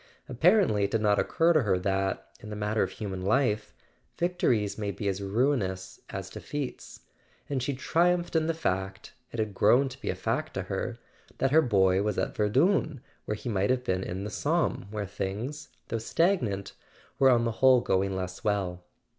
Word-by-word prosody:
Apparently 160 - +3
it - - -2
did 110 +1 0
not 105 -1 +3
occur 165 +1 +3
to 155 - +4
her 100 -5 +1
that, 95 +1 -1
in 105 - -10
the 105 - -5
matter 105 +1 0
of - - +1
human 95 -3 -5
life, 105 +1 +1 0.5
victories 130 - +1
may 105 -2 -3
be 100 +1 -4
as 95 0 -1
ruinous 100 -3 -1
as - - -5
defeats; 145 -3 -6 0.5
and 135 -3 -2
she 135 +2 -2
triumphed 175 +5 +1
in 160 -1 +2
the 165 - +1
fact—it 95 - -4
had 110 -2 -1
grown 125 +8 +4
to 130 +1 -12
be - - -3
a - - -1
fact - - -2
to - - -2
her—that 135 - -4
her 160 +2 +6
boy 95 -7 +3
was 105 -1 -1
at - - -1
Verdun, 135 - +2 0.3
when 105 - -2
he - - -9
might 100 -3 0
have 130 -1 +1
been 95 -6 0
in 95 +3 -4
the 105 - -5
Somme, 155 - 0
where 105 -1 -3
things, 105 +10 -5 0.2
though 115 - -1
stagnant, 115 - 0 0.5
were 135 -1 +6
on 120 -2 +4
the 115 - 0
whole 130 -1 +7
going 95 -3 0
less 90 -1 -5
well. 95 -4 -1
110 Hz, 185 wpm, -28 LUFS, 100-135 Hz, 0.5 s, whole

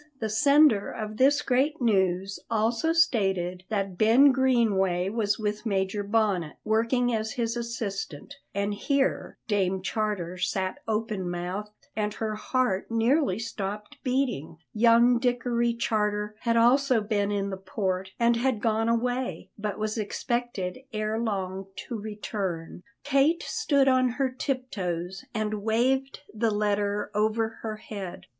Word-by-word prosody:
The 220 - -2
sender 280 -1 +4
of 215 0 -6
this 285 +3 +4
great 275 +5 +1
news 195 -4 +1
also 230 +7 +1
stated 195 - +1
that 195 -4 -2
Ben 245 +6 +6
Greenway 210 -9 +2
was 210 -1 0
with 210 -1 -2
Major 195 -2 0
Bonnet, 200 -6 0
working 230 +3 +1
as 220 0 -1
his 230 -1 -1
assistant 230 - -4 0.2
and 200 +1 -1
here 275 +6 0
Dame 190 -3 0
Charter 190 -5 -2
sat 185 +1 -1
open 215 -4 -1
mouthed 180 +4 -4 0.3
and 210 -1 -1
her 220 -1 -2
heart 215 -2 -1
nearly 230 - +2
stopped 210 +3 -5
beating 250 - -1 0.2
young 235 +2 +5
Dickory 240 -1 +1
Charter 210 -2 -1
had 230 +1 +1
also 250 +1 +4
been 205 -1 0
in 200 -1 -1
the - - -2
port 190 0 -3
and 235 0 +3
had 245 -2 +1
gone 225 0 +1
away, 245 +2 -1
but 210 -1 -4
was 215 +1 -2
expected 215 -2 -2
ere 215 0 -1
long 195 -4 -3
to 240 - -6
return. 205 -6 -4 0.2
Kate 285 +5 +2
stood 280 -2 +1
on 255 -1 +4
her 270 -2 +1
tip 255 0 -3
toes 180 +2 -4
and 215 -1 -1
waved 255 +5 +1
the 225 +1 +1
letter 205 -1 0
over 220 +1 0
her 220 -1 -4
head. 200 -4 -7
215 Hz, 135 wpm, -27 LUFS, 200-240 Hz, 0.3 s, Ben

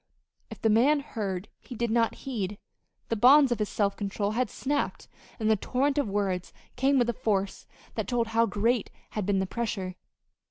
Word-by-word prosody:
If - - -9
the 225 - +2
man 275 +7 +4
heard, 200 -8 -4
he 250 - -10
did 235 0 -1
not 230 0 +2
heed. 210 -7 -3 0.5
The 230 - +1
bonds 265 +4 +7
of 240 - 0
his 210 - -1
self 200 -2 0
control 200 0 -2
had 240 +1 0
snapped, 285 +6 -2 0.3
and 220 - 0
the 220 - +5
torrent 270 +7 0
of 280 - 0
words 195 -3 -1 0.2
came 270 +2 +3
with 240 -2 +3
a - - -10
force 200 -3 -1 0.3
that - - -3
told 235 -2 0
how 230 +1 +3
great 220 +3 +1 0.2
had 210 -3 -3
been 200 -1 +2
the 190 - +1
pressure. 195 -3 -3
225 Hz, 190 wpm, -28 LUFS, 200-250 Hz, 0.5 s, bonds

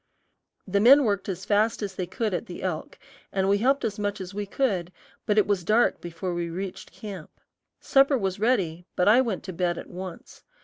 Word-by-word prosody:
The 200 +1 +1
men 270 +7 +7
worked 200 -4 -1
as 190 0 -4
fast 215 +2 +2
as 200 -2 -4
they 185 -1 -4
could 220 -2 -2
at 175 - -3
the 175 - -8
elk, 180 -4 -4 0.3
and 190 -1 0
we 200 +1 +3
helped 270 +5 +2
as 210 -1 -3
much 205 0 -2
as 185 0 -7
we 205 0 -4
could, 195 -8 -1 0.4
but 210 - +2
it 210 - +5
was 200 -4 0
dark 220 +7 +2
before 175 +1 -4
we 170 -1 -2
reached 185 +2 -6
camp. 195 -7 -8 0.5
Supper 275 0 +4
was 195 -3 -2
ready, 185 -7 0
but 180 - +2
I 230 +5 +7
went 225 -7 -2
to 185 - -6
bed 175 0 0
at - - -8
once. 185 -1 -9
195 Hz, 210 wpm, -26 LUFS, 180-215 Hz, 0.5 s, men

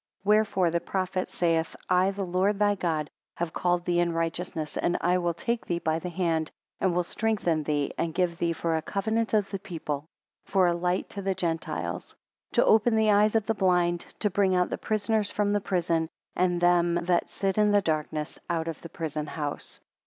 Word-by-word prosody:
21 210 +1 +5
Wherefore 190 -5 +2
the 170 - +1
prophet 185 0 -2
saith 165 -2 0
I 185 +1 +4
the 195 0 -3
Lord 185 +3 +1
thy 205 0 +3
God 160 -6 -2 0.2
have 170 -1 -3
called 175 0 0
thee 175 -1 +2
in 170 -1 +1
righteousness, 165 -1 -3
and 175 - +1
I 180 +1 +2
will 175 -1 -1
take 235 +4 -2
thee 170 - 0
by 160 -1 0
thy 180 - -5
hand, 165 -3 0 0.3
and 185 -3 +1
will 180 - +2
strengthen 185 -5 0
thee, 145 -1 -1
and 165 - 0
give 175 -2 0
thee 170 -1 +1
for 165 0 -1
a 160 - 0
covenant 220 +5 -1
of 205 -2 +1
the 195 - -3
people; 155 -5 -5 0.4
for 190 -2 +2
a 175 - +3
light 180 +1 -1
to 200 - -4
the 195 -1 -1
Gentiles. 165 -3 -3 0.4
To - - +4
open 220 +1 +4
the 220 -1 +4
eyes 210 +2 +4
of 220 -2 +2
the 225 - +1
blind, 180 -3 +1
to 210 - 0
bring 190 -1 +2
out 180 0 +1
the - - -1
prisoners 215 -1 0
from 205 -1 0
the 205 - +1
prison, 170 -4 0 0.3
and 180 -1 +2
them 175 -1 +3
that 175 -1 +1
sit 195 +1 -1
in 210 0 +4
darkness 155 -2 -2
out 165 -1 -1
of 165 - -5
the 170 - -9
prison 155 -2 -4
house. 145 -2 -5
175 Hz, 205 wpm, -27 LUFS, 165-200 Hz, 0.4 s, 21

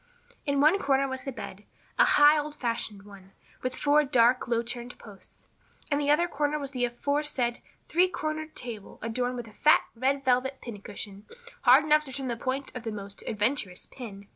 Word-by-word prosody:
In 280 0 +1
one 310 +7 +5
corner 275 -3 +2
was 260 -1 -6
the 270 - -3
bed, 205 -5 -8 0.4
a - - +8
high, 295 +1 +7
old 300 0 -2
fashioned 230 -6 -3
one, 195 -1 -15 0.3
with 255 0 -3
four 295 +1 +3
dark, 250 -3 +3
low 235 -1 +1
turned 240 +1 -6
posts. 205 -4 -13 0.4
In 285 - +2
the 290 0 0
other 325 +4 +4
corner 295 -2 -1
was 280 -2 -5
the 250 -3 0
aforesaid 255 0 -1 0.3
three 355 +3 +4
corner 310 -2 -3
table 235 -9 -7
adorned 245 +2 -1
with 240 -2 -6
a 215 - -14
fat, 305 +8 +5
red 270 +3 0
velvet 260 +1 +2
pin 215 -5 -8
cushion 205 0 -8 0.3
hard 265 +3 +7
enough 305 0 +4
to 265 - -9
turn 265 -1 -3
the 235 - -1
point 260 +4 -4
of 250 - -4
the 225 -1 -4
most 200 -1 -7
adventurous 210 -4 -1
pin. 200 -6 -10
255 Hz, 190 wpm, -28 LUFS, 230-290 Hz, 0.4 s, a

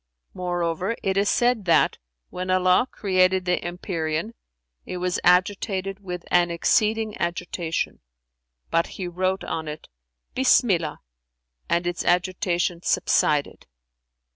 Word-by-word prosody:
Moreover, 175 +3 -2
it 190 -1 0
is 200 +1 +2
said 240 -4 +2
that, 170 - +3 0.3
when 185 +1 -5
Allah 185 +5 +3
created 185 -1 +2
the 180 0 0
empyrean, 175 +2 -3 0.5
it 180 - -6
was 180 0 -1
agitated 190 +1 +1
with 180 -3 -7
an 175 -1 +4
exceeding 215 +5 +1
agitation; 170 -1 -2 0.7
but 165 0 +2
He 185 - -3
wrote 185 +2 -1
on 160 -1 -4
it, 150 +1 -8 0.4
'Bismillah' 210 - +2 0.7
and 170 +1 +1
its 175 0 -2
agitation 175 -1 0
subsided. 150 -4 +1
180 Hz, 115 wpm, -24 LUFS, 175-195 Hz, 0.7 s, an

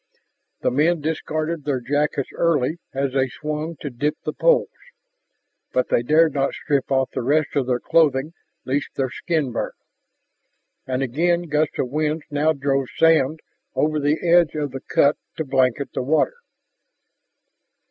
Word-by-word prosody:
The - - +1
men 160 +6 +2
discarded 155 +1 -2
their 140 -3 -1
jackets 145 +1 -1
early 160 -1 +1
as 135 -1 -2
they 135 -1 +1
swung 155 +4 -4
to 145 - -4
dip 145 +5 -1
the - - -2
poles. - - +3 1.0
But 125 - +1
they - - +3
dared 155 +4 +4
not 140 -1 0
strip 140 -2 -1
off 130 -1 +1
the - - -2
rest 145 +5 +1
of 135 -3 +1
their 125 -1 +1
clothing 155 -1 +2 0.3
lest 135 +2 -1
their 130 -2 -1
skin 155 -7 -1
burn. 115 - -3 1.1
And 130 +1 -1
again 170 +7 +1
gusts 150 -2 0
of 125 - -1
wind 155 +1 -1
now 150 +2 +2
drove 135 -2 0
sand 160 -2 +3 0.3
over 155 0 +1
the 150 +4 0
edge 170 -2 +4
of 145 -2 -2
the 135 0 -6
cut 145 +1 +2 0.2
to 160 - -2
blanket 130 0 +1
the - - -1
water. 160 - +1
150 Hz, 155 wpm, -22 LUFS, 135-160 Hz, 1.1 s, dared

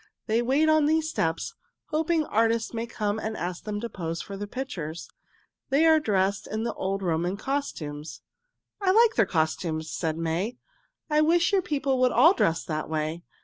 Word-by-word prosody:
They 225 +1 +1
wait 275 +6 +2
on 310 -1 +4
these 315 0 +1
steps, 165 0 -1 0.4
hoping 320 0 +1
artists 230 0 +1
may 230 0 -3
come 210 -2 -2
and 220 0 -4
ask 175 0 -4
them 210 -1 -3
to 235 - -3
pose 165 -6 -4
for 200 - -6
their 205 +1 -5
pictures. 180 - -5 0.6
They 280 +4 +4
are 320 -1 +6
dressed 200 -6 0
in 220 +1 -3
the 235 - -2
old 195 +1 -2
Roman 175 +2 0
costumes." 160 - -4 0.6
"I 390 - +2
like 445 +4 +5
their 220 -4 +3
costumes," 160 -1 -1
said 160 -2 -2
May. 170 +9 -2 0.5
"I 305 -1 +3
wish 335 +3 +3
your 390 - +4
people 280 -6 0
would 255 -1 +4
all 305 - +6
dress 165 - +1
that 155 -1 -4
way. 155 +1 -2
220 Hz, 180 wpm, -26 LUFS, -, 0.6 s, are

